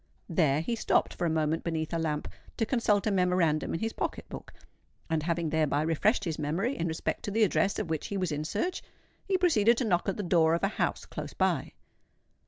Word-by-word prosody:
There 155 -4 +2
he 235 +8 -2
stopped 225 - +1
for 175 - -1
a - - +1
moment 160 0 0
beneath 160 -1 -2
a 165 - 0
lamp 155 -2 -2 0.3
to 225 - +1
consult 215 -4 +1
a 215 - +2
memorandum 180 -5 +1
in - - -4
his 225 0 -1
pocket - - -4
book; - - -9 0.6
and, 160 -1 +1
having 165 0 -1
thereby 155 -2 +1
refreshed 180 +8 +2
his 165 -5 -3
memory 175 - -1
in 170 - -2
respect 160 0 -2
to - - -2
the 220 +2 +2
address 200 0 +2
of 165 - -3
which 160 - -2
he 200 - -3
was 185 -3 -1
in 150 0 -2
search, 350 - -2 0.5
he 385 -1 +2
proceeded 235 - +4
to 255 - 0
knock 180 -2 +1
at 195 - -2
the 205 - -2
door 165 -2 +3
of 170 - -4
a - - +4
house - - -2
close - - -7
by. - - 0
170 Hz, 220 wpm, -29 LUFS, 160-210 Hz, 0.6 s, proceeded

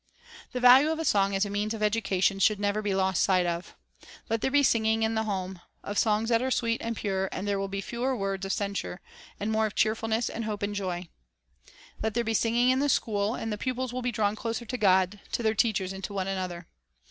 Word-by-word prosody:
The 250 - -3
value 255 +4 +7
of 320 0 -2
song 200 -4 +2
as 195 +2 +2
a - - -5
means 210 +2 -1
of 215 - -4
education 195 -3 +1
should 210 +1 +3
never 205 +1 0
be 205 -2 -1
lost 190 -1 +1
sight 185 -2 +3
of. 170 0 -4 0.6
Let 225 -1 +1
there - - +1
be 285 +1 +3
singing 225 -3 +2
in 220 0 +1
the 220 0 0
home, 190 -3 -4 0.2
of 205 - -2
songs 220 +1 +1
that 230 -1 +3
are 260 - 0
sweet 230 -2 0
and 230 0 -3
pure, 190 -2 -1
and 195 - -4
there 200 -1 0
will 195 - -2
be 195 0 -4
fewer 245 +5 -2
words 195 -1 -2
of 195 - -2
censure, 200 -3 -3 0.4
and 210 +2 -2
more 220 0 +2
of 210 - -9
cheerfulness 225 +1 +1
and 230 - -4
hope 210 -2 -4
and 205 0 -1
joy. 185 -3 -3 0.9
Let 220 0 -2
there 235 - +1
be 225 0 -1
singing 235 +3 +3
in 260 - +2
the 290 +1 +1
school, 210 -3 +1
and 225 -3 -3
the 210 - -5
pupils 255 +1 -2
will 255 - -3
be 250 0 -1
drawn 210 -2 0
closer 230 +2 -4
to 250 - -4
God, 190 0 +3
to 235 - -1
their 220 -1 +2
teachers, 210 -4 0
and 190 0 -8
to 205 - -7
one 190 -1 -1
another. 185 -2 -4
210 Hz, 240 wpm, -28 LUFS, 195-230 Hz, 0.9 s, value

